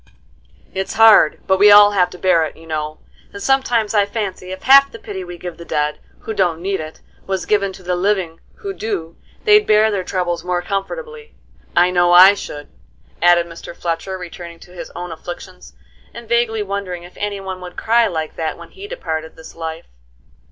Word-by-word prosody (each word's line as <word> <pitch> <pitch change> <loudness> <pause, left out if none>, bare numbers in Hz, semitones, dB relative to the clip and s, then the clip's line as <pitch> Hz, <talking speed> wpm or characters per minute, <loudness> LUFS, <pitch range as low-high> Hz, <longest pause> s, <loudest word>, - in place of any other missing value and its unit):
"It's 190 0 -4
hard, 220 -8 +6
but 190 0 +2
we 205 +1 +7
all 205 0 +8
have 185 -3 +2
to - - -11
bear 180 -3 +3
it, 155 - -6
you 165 - -15
know; 155 -1 -4 0.3
and 200 - -9
sometimes 245 -5 +1
I 205 -2 +3
fancy 200 -4 -5
if 185 - -8
half 275 +1 +7
the - - -9
pity 200 -4 -7
we 175 -1 -9
give 175 0 -8
the 170 - -9
dead, 150 -2 -2 0.2
who 220 - -5
don't 175 -5 0
need 195 +2 -2
it, 155 0 -9 0.3
was 190 -1 -2
given 200 -2 +1
to 185 - -13
the 180 0 -1
living, 180 -3 -1 0.2
who 400 -3 -6
do, 190 - -4 0.3
they'd 425 -1 +5
bear 215 +1 +4
their 195 -3 -2
troubles 175 -3 -2
more 180 0 -2
comfortably. 455 - -5 0.4
I 175 +1 +4
know 175 -1 +3
I 185 +3 +9
should," 145 -7 -8 0.5
added 175 0 +5
Mr. 170 0 -10
Fletcher, 175 +3 -3
returning 175 -1 -9
to 180 - -15
his 175 -2 -9
own 175 0 -6
afflictions, 60 - -10 0.4
and 235 - -9
vaguely 230 -2 +1
wondering 195 -3 -5
if 175 - -13
any 205 -1 -3
one 190 -1 -7
would 180 -1 -10
cry 230 +1 +3
like 160 -5 -4
that 160 -1 -3
when - - -13
he 395 +1 -10
departed 160 - -5
this 160 - -13
life. 165 0 -6
185 Hz, 195 wpm, -18 LUFS, 170-210 Hz, 0.5 s, I